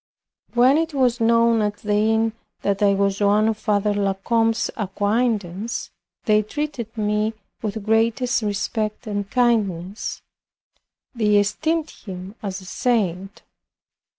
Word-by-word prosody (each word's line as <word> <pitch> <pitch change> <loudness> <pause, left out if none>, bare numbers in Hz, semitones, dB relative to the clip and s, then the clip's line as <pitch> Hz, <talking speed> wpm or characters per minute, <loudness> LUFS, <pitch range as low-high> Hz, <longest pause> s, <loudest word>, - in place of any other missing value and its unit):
When 255 +5 +5
it 325 -2 -2
was 250 -3 +2
known 230 0 +4
at 205 -1 -1
the 210 0 -2
inn, 220 +1 +2 0.3
that 200 0 0
I 200 -1 +4
was 200 0 0
one 205 +2 +4
of 225 - +1
Father 210 -1 +1
La 200 -1 0
Combe's 225 +3 +1
acquaintance, 210 0 -1 0.3
they 215 -1 +4
treated 240 -1 -5
me 210 +1 0 0.3
with 210 -1 -4
greatest 230 +3 +2
respect 215 +2 -2
and 205 -2 -3
kindness. 210 -6 0 0.9
They 215 -4 +2
esteemed 315 +10 0
him 185 0 -9
as 195 -2 -4
a - - -13
saint. 195 -3 -1
215 Hz, 125 wpm, -22 LUFS, 200-230 Hz, 0.9 s, When